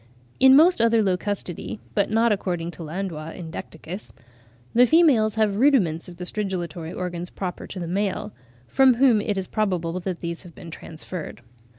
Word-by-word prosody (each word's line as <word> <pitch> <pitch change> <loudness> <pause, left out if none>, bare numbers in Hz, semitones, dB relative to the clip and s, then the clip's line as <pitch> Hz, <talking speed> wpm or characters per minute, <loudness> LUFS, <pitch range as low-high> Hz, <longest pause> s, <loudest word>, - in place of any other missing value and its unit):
In 265 0 +8
most 330 -1 +6
other 230 -1 +4
Locustidae 180 - -3 0.2
(but - - +1
not 225 +1 +3
according 175 -4 -2
to 175 - -11
Landois 165 -1 -5
in 165 -3 -8
Decticus) 165 +5 -8 0.6
the 245 +2 +6
females 260 -10 +4
have 215 -2 +1
rudiments 210 - +2
of 175 - -12
the 180 - -6
stridulatory 175 -5 -3
organs 175 -1 -4
proper 180 -2 -5
to 190 - -7
the 170 - -4
male; 195 +3 -2 0.3
from 260 - +5
whom 240 -4 +4
it 205 -1 -2
is 190 - -2
probable 180 -5 -1
that 180 -1 -4
these 170 0 -4
have 175 -3 -14
been 170 - -10
transferred. 160 -3 -7
185 Hz, 170 wpm, -24 LUFS, 170-220 Hz, 0.6 s, In